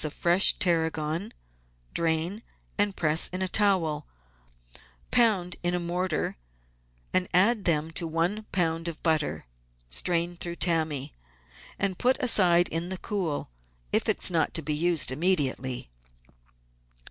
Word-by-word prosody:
of 155 Hz, -, -2 dB
fresh 175 Hz, +3 st, +4 dB
tarragon, 165 Hz, +2 st, 0 dB, 0.6 s
drain, 165 Hz, +5 st, -1 dB, 0.5 s
press 155 Hz, 0 st, +3 dB
in 185 Hz, +1 st, -4 dB
a -, -, 0 dB
towel, 180 Hz, -7 st, +1 dB, 1.0 s
pound 195 Hz, -7 st, +2 dB
in 175 Hz, 0 st, 0 dB
a -, -, -1 dB
mortar, 175 Hz, -, -2 dB, 0.8 s
and 185 Hz, -1 st, +1 dB
add 205 Hz, +4 st, +4 dB
to 175 Hz, -, +3 dB
them 155 Hz, +1 st, -1 dB, 0.2 s
one 180 Hz, +7 st, -1 dB
lb. 165 Hz, -2 st, 0 dB
of 165 Hz, -2 st, -6 dB
butter. 155 Hz, -3 st, 0 dB, 0.5 s
Strain 170 Hz, -, 0 dB
through 170 Hz, 0 st, -4 dB
tammy, 160 Hz, -6 st, -1 dB, 0.6 s
and 190 Hz, -2 st, -2 dB
put 255 Hz, +1 st, +3 dB
aside 180 Hz, -8 st, +4 dB
in 165 Hz, +2 st, -2 dB
the 190 Hz, -, -3 dB
cool 175 Hz, -, -3 dB, 0.4 s
if -, -, +1 dB
it -, -, +1 dB
is -, -, +4 dB
not 165 Hz, -2 st, 0 dB
to 165 Hz, -, -3 dB
be 150 Hz, +1 st, -2 dB
used 160 Hz, -4 st, +1 dB
immediately. 130 Hz, -, -1 dB
170 Hz, 130 wpm, -27 LUFS, 160-185 Hz, 1.0 s, fresh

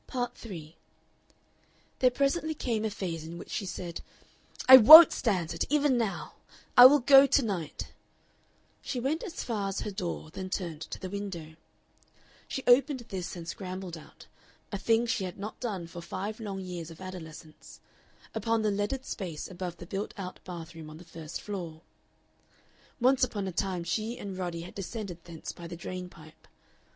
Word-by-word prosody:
Part 245 Hz, -1 st, -3 dB
3 170 Hz, -10 st, -10 dB, 1.2 s
There 255 Hz, -, +5 dB
presently 280 Hz, +5 st, 0 dB
came 225 Hz, -6 st, -2 dB
a -, -, 0 dB
phase 170 Hz, -6 st, -5 dB
in 165 Hz, +2 st, -8 dB
which -, -, -10 dB
she 200 Hz, -, -3 dB
said: 175 Hz, -2 st, -6 dB, 0.7 s
"I 260 Hz, 0 st, +13 dB
WON'T 310 Hz, +8 st, +12 dB
stand 180 Hz, -8 st, -1 dB
it 165 Hz, -, -1 dB
even 290 Hz, -2 st, +3 dB
now. 225 Hz, -5 st, -2 dB, 0.4 s
I 245 Hz, +1 st, +12 dB
will 290 Hz, +1 st, +4 dB
go 270 Hz, +2 st, +8 dB
to 280 Hz, -, +4 dB
night." 180 Hz, -7 st, -4 dB, 0.9 s
She 255 Hz, -, -4 dB
went 280 Hz, +6 st, -1 dB
as 385 Hz, -8 st, -6 dB
far 210 Hz, -4 st, -2 dB
as 195 Hz, -, -3 dB
her 210 Hz, -, -4 dB
door, 175 Hz, -5 st, -5 dB
then 185 Hz, +2 st, -6 dB
turned 170 Hz, -5 st, -4 dB
to 155 Hz, -, -6 dB
the 185 Hz, -, -6 dB
window. 185 Hz, -6 st, -6 dB, 0.9 s
She 270 Hz, -, -4 dB
opened 260 Hz, +2 st, +4 dB
this 180 Hz, -3 st, -5 dB
and 170 Hz, -2 st, -8 dB
scrambled 185 Hz, -1 st, -6 dB
out 160 Hz, -, -14 dB, 0.5 s
a 200 Hz, -, -3 dB
thing 230 Hz, +2 st, +2 dB
she 225 Hz, -4 st, -1 dB
had 180 Hz, -, -7 dB
not 205 Hz, +2 st, -7 dB
done 200 Hz, -8 st, -4 dB
for 170 Hz, +1 st, -9 dB
five 200 Hz, +6 st, -5 dB
long 200 Hz, -3 st, -5 dB
years 175 Hz, -3 st, -6 dB
of 165 Hz, -, -12 dB
adolescence 160 Hz, -4 st, -10 dB, 0.5 s
upon 225 Hz, 0 st, 0 dB
the 210 Hz, -, +2 dB
leaded 205 Hz, +7 st, -2 dB
space 175 Hz, -7 st, -5 dB
above 180 Hz, -1 st, -6 dB
the 175 Hz, -, -10 dB
built 195 Hz, +4 st, -5 dB
out 185 Hz, -2 st, -7 dB
bath 170 Hz, -3 st, -8 dB
room 160 Hz, -2 st, -10 dB
on 155 Hz, -, -10 dB
the 170 Hz, -, -12 dB
first 160 Hz, -1 st, -8 dB
floor. 175 Hz, -6 st, -6 dB, 1.2 s
Once 255 Hz, +2 st, +3 dB
upon 205 Hz, -6 st, -1 dB
a -, -, -3 dB
time 180 Hz, 0 st, -2 dB
she 220 Hz, +7 st, -2 dB
and 195 Hz, -2 st, -6 dB
Roddy 175 Hz, -2 st, -4 dB
had 175 Hz, -, -10 dB
descended 195 Hz, -3 st, -6 dB
thence 165 Hz, -2 st, -7 dB
by 170 Hz, -, -10 dB
the 170 Hz, 0 st, -8 dB
drain 180 Hz, +1 st, -6 dB
pipe. 155 Hz, -2 st, -17 dB
190 Hz, 180 wpm, -29 LUFS, 170-230 Hz, 1.2 s, I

